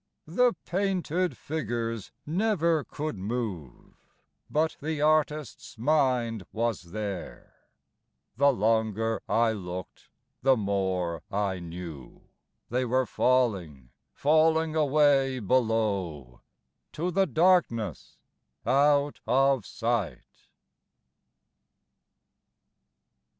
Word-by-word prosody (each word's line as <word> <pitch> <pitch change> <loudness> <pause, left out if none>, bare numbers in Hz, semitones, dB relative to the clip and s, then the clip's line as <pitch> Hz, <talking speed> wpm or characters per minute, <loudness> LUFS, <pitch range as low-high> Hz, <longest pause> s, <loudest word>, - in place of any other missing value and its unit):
The 240 +10 +3
painted 185 -2 -1
figures 115 -7 -3
never 170 -3 +1
could 150 -9 -5
move, 100 - -5 0.6
But 155 +1 +1
the 155 +1 -3
artist's 150 -5 0
mind 125 -5 +1
was 115 -4 -2
there: 100 -3 -6 0.8
The 140 +3 +5
longer 110 -1 0
I 115 0 +3
look'd 90 -3 -7 0.3
the 135 0 +4
more 95 -5 -1
I 100 -2 -1
knew 85 -6 -9 0.5
They 125 +1 +1
were 130 +1 +1
falling, 95 - 0 0.2
falling 160 +1 +2
away 145 -3 +3
below 100 - -1 0.5
To 175 +4 -2
the 195 +2 +2
darkness 160 - +1 0.5
out 145 +1 +3
of 135 -4 +3
sight. 115 -3 -3
120 Hz, 80 wpm, -28 LUFS, 100-150 Hz, 0.8 s, The